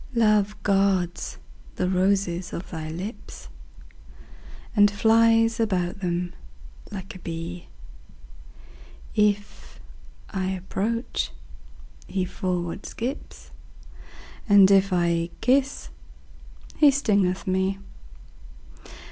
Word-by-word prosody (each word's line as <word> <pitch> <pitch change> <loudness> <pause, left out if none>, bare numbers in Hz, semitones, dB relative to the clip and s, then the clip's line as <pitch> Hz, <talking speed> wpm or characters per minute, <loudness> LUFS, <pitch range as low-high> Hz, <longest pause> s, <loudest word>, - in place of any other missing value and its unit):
Love 210 -2 +3
guards 195 -3 +1 0.4
the 180 - 0
roses 185 -1 0
of 175 - -6
thy 160 -2 -5
lips, 185 +8 -8 1.3
And 205 -1 +6
flies 225 +2 +3
about 185 -5 0
them 175 -1 -2 0.6
like 195 -2 -7
a 185 - -11
bee: 170 +1 -6 1.5
If 205 - -1 0.5
I 190 -1 -2
approach, 195 +5 -2 0.8
he 190 -2 -1
forward 180 0 -3
skips, 255 +6 -6 1.0
And 200 -1 +7
if 195 0 +4
I 170 -1 +1
kiss, 270 +2 +1 0.9
he 300 - +7
stingeth 200 -9 +1
me. 190 +1 0
195 Hz, 85 wpm, -25 LUFS, 180-210 Hz, 1.5 s, And